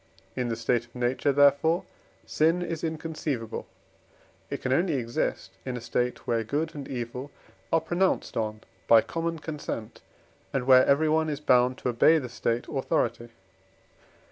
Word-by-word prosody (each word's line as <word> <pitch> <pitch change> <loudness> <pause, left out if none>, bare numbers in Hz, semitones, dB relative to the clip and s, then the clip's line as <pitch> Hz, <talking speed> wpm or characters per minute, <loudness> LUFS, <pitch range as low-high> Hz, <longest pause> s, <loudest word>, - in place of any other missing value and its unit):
In 125 -2 -1
the 115 - -1
state 115 +1 0
of 120 - -28
nature, 125 +3 +1
therefore, 145 +5 +4 0.4
sin 165 +3 +2
is 165 -2 -4
inconceivable; 155 -7 -4 0.8
it - - -3
can 130 - +1
only 170 +1 +2
exist 120 -2 -2
in 125 -2 -4
a - - -4
state, 120 0 -2
where 115 -1 0
good 150 +8 -2
and 145 -2 -7
evil 125 +2 -5 0.4
are 165 - +3
pronounced 175 +4 0
on 110 -1 -2 0.3
by 115 -1 +7
common 165 +4 -3
consent, 150 -8 -6 0.5
and 135 -2 -1
where 130 -1 +7
everyone 155 +2 +3
is 145 -2 -3
bound 125 -3 +3
to - - -2
obey 125 +7 +5
the 130 -5 -4
State 115 0 -2
authority. 130 -4 -1
135 Hz, 150 wpm, -27 LUFS, 120-160 Hz, 0.8 s, by